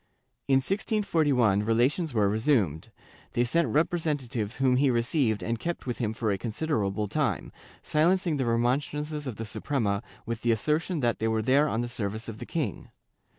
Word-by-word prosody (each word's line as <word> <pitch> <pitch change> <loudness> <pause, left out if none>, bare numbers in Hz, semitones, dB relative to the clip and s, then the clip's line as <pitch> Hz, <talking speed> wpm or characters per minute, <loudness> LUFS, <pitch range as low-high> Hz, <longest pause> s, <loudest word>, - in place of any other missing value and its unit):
In 135 - +4
1641, 145 - +2
relations 125 - +1
were 105 -4 +2
resumed; 105 - +1 0.4
they 120 - +2
sent 165 +6 +2
representatives 145 - -1
whom 130 -1 +3
he 140 +1 +3
received 120 -2 +1
and 115 0 -2
kept 170 +7 -4
with 125 -2 -3
him 110 -3 0
for 110 -1 -1
a 100 - -1
considerable 110 -5 -1
time, 115 - -1 0.3
silencing 170 +1 +2
the 130 - 0
remon 120 +3 +2
strances 150 0 -5
of 125 - -4
the 115 - -5
Suprema 105 -4 -1 0.2
with 115 0 -4
the 120 - +2
assertion 155 - 0
that 120 -2 +1
they 110 - 0
were 110 -1 0
there 140 +6 +4
on 110 - 0
the 120 - -2
service 110 -2 -4
of 110 -2 -7
the - - -7
king. - - -3
120 Hz, 175 wpm, -28 LUFS, 110-150 Hz, 0.4 s, In